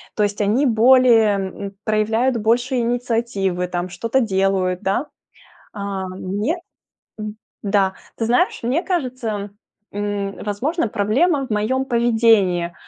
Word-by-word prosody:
То - - -1
есть 205 0 -1
они 225 +8 +2
более, 235 -2 +5
м, 195 +1 -6
проявляют 220 +4 +1
больше 240 +4 +1
инициативы, 230 -6 -1
там, 180 0 -3
что-то 230 +8 -1
делают, 190 -4 0
да? 200 +10 0 0.7
А 200 -2 -4
мне, 200 - -2 0.6
м, 215 0 -6 0.3
да. 195 -2 +1 0.2
Ты 225 - -1
знаешь, 250 - +2
мне 260 +9 0
кажется, 250 - -3 0.4
м, 205 -1 -3
возможно 240 - -1
проблема 265 - +1
в - - -19
моём 220 +5 0
поведении. 225 -8 +2
215 Hz, 120 wpm, -20 LUFS, 200-245 Hz, 0.7 s, более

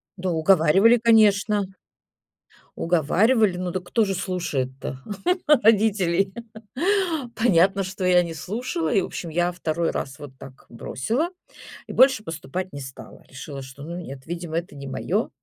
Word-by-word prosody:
Да 185 -1 -3
уговаривали, 185 +7 +4
конечно. 210 -3 +3 1.1
Уговаривали. 180 - +2
Ну 180 -1 -3
дак 185 0 -4
кто 225 +5 +1
же 195 -2 -1
слушает-то 135 -9 -3 0.5
родителей? 205 - +3 1.0
Понятно, 195 -3 +3
что 190 0 -6
я 180 -1 +4
не 165 -1 -6
слушала. 180 -2 -3
И 195 - +3
в - - -2
общем, 170 - -6
я 175 +2 0
2 170 -1 -2
раз 135 0 -5
вот 145 -2 -9
так 130 -1 -13
бросила 230 - -2 0.6
и - - -7
больше 260 -4 +5
поступать 165 +2 -5
не 140 - -6
стала. 130 0 -11
Решила, 135 +1 -8
что, 135 +2 -11
ну, 170 +3 -6
нет, 135 -6 -9
видимо, 170 -1 -4
это 170 -3 -5
не 140 -1 -8
моё. 135 - -2
180 Hz, 145 wpm, -23 LUFS, 155-200 Hz, 1.1 s, больше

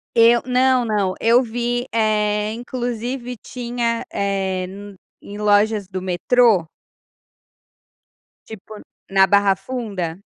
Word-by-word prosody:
Eu 235 +1 +5
não, 255 -1 +2
não. 205 -4 0
Eu 235 +3 +4
vi, 240 +1 -2
eh, 210 -1 +1
inclusive 245 +1 -4
tinha, 235 -1 -3
eh, 190 -2 -1
n 200 +1 -10 0.3
em 205 +1 -9
lojas 210 -1 +2
do 185 -1 -6
metrô? 190 0 +2 1.8
Tipo 215 0 -11 0.3
na 195 0 +5
Barra 200 -1 +3
Funda? 195 -6 -5
215 Hz, 105 wpm, -20 LUFS, 195-240 Hz, 1.8 s, Eu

